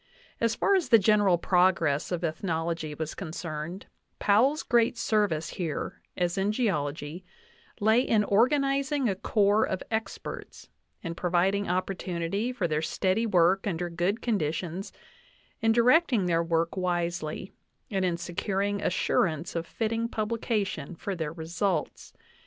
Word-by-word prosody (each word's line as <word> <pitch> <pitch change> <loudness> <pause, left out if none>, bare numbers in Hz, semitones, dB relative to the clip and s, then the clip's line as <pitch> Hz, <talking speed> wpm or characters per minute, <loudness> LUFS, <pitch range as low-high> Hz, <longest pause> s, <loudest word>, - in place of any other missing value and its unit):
As 230 -1 +1
far - - +2
as 365 -9 +2
the 230 - +8
general 205 -3 +4
progress 175 -5 +2
of 175 -1 -2
ethnology 165 -1 -2
was 160 0 -4
concerned, 165 0 -6 0.3
Powell's 255 +10 +3
great 235 0 +2
service 205 -9 +1
here, 165 -5 -4 0.2
as 175 +1 0
in 200 +2 +1
geology, 160 - -2 0.6
lay 220 +4 +4
in 220 -5 +2
organizing 275 +5 +2
a 200 - +1
corps 205 +2 +2
of 190 - -2
experts, 220 0 -5 0.3
in 165 -2 -3
providing 180 +3 +1
opportunity 185 +3 -2
for 240 -8 -1
their 155 -1 0
steady 190 +7 0
work 185 0 +3
under 175 -2 -2
good 180 +7 -1
conditions, 180 -2 -2 0.7
in 225 0 +3
directing 240 - +4
their 165 -1 +2
work 165 +1 0
wisely, 175 -2 -2 0.4
and 190 -2 0
in 175 -2 +1
securing 195 +4 -2
assurance 170 -2 0
of 165 0 -2
fitting 230 0 -1
publication 215 - -2
for 195 +4 -4
their 160 -3 -3
re 160 -1 -7
s^ - - -11
suits. 175 -2 -2
190 Hz, 135 wpm, -28 LUFS, 170-220 Hz, 0.7 s, the